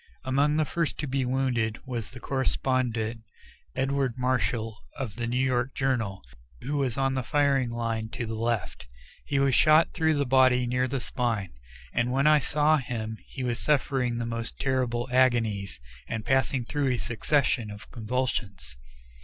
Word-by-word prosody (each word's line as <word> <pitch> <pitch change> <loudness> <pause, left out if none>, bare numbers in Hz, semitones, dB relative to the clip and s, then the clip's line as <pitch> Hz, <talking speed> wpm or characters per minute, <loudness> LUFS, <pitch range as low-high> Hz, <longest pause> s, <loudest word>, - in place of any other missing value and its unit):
Among 140 +3 +2
the 155 - +2
first 170 +1 -2
to 150 - -3
be 135 0 0
wounded 125 -3 0
was 120 -4 -4
the 130 - -11
correspondent, 125 -4 -1 0.5
Edward 135 -2 0
Marshall, 115 -3 0 0.2
of 125 -8 -4
the 120 0 -3
New 120 +1 -1
York 130 0 +1
Journal, 115 -8 -1 0.4
who 145 +2 -2
was 135 -4 0
on 135 0 +1
the 130 - 0
firing 140 -1 +2
line 115 -1 -2
to 120 - -3
the 115 - -4
left. 110 - -2 0.4
He 140 - -1
was 135 -1 +3
shot 155 +4 +5
through 160 -1 +2
the 145 -1 +1
body 130 -1 +4
near 125 +1 +1
the 135 +1 -2
spine, 115 -6 -2 0.4
and 120 +1 +1
when 135 +2 +2
I 150 0 +6
saw 150 +3 +3
him 110 -5 -4
he 135 - -6
was 120 -2 -1
suffering 130 -5 +1
the 120 - -2
most 115 0 -4
terrible 130 -3 0
agonies, 115 - +2 0.3
and 110 -1 -4
passing 130 -1 +1
through 145 +1 0
a - - -1
succession 120 +2 0
of 105 0 -10
convulsions. 110 - -3
125 Hz, 165 wpm, -27 LUFS, 115-135 Hz, 0.5 s, I